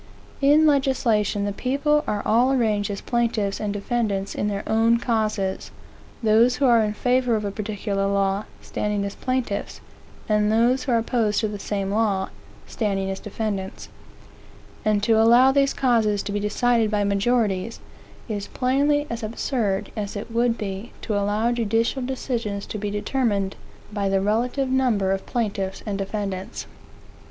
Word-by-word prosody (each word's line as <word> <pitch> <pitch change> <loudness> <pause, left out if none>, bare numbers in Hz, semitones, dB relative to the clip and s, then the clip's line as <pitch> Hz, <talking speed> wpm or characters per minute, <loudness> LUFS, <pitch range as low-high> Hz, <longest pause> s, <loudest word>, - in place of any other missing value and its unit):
In 295 +3 +5
legislation, 240 -8 +2
the 205 - -1
people 285 +6 +1
are 205 - -1
all 240 +5 +3
arranged 215 -6 +1
as 200 -1 -4
plaintiff's 225 -4 0
and 210 -1 -2
defendants 205 -2 -2
in 205 - -1
their 200 -1 -2
own 225 +1 +3
causes; 215 -5 -1 0.5
(those 225 +3 +4
who 275 - +1
are 235 -3 +5
in 210 -1 0
favor 250 0 +2
of 210 -1 -2
a 200 - -2
particular 200 -1 -2
law, 200 +1 0 0.2
standing 210 -1 -2
as 200 - -4
plaintiff's, 255 -6 -3 0.5
and 210 -1 +2
those 240 +4 +3
who 260 - -1
are 235 - +4
opposed 225 -2 +1
to 220 - +1
the 205 -1 -6
same 195 -1 -2
law, 205 -3 +1 0.4
standing 195 -3 -2
as 190 - -5
defendants); 205 -2 -4 0.9
and 210 -1 +1
to 220 +1 +4
allow 240 +4 +6
these 275 0 +3
causes 225 -6 +1
to - - -4
be 205 - -1
decided 225 +2 +1
by 210 -1 +1
majorities, 200 0 0 0.5
is 205 -3 -4
plainly 285 +3 +1
as 235 -3 -5
absurd 215 -3 -2
as 205 -2 -4
it 205 +3 -6
would 235 0 +1
be 195 +2 -5
to 215 - -2
allow 205 +3 +1
judicial 230 +2 0
decisions 240 -5 -3
to 215 - -5
be 205 0 -2
determined 205 -2 -1 0.4
by 200 -2 0
the 195 0 +2
relative 240 +7 0
number 245 -7 +1
of 195 0 -2
plaintiffs 200 -5 -2
and 200 -2 -3
defendants. 195 -1 -4
215 Hz, 160 wpm, -23 LUFS, 200-240 Hz, 0.9 s, allow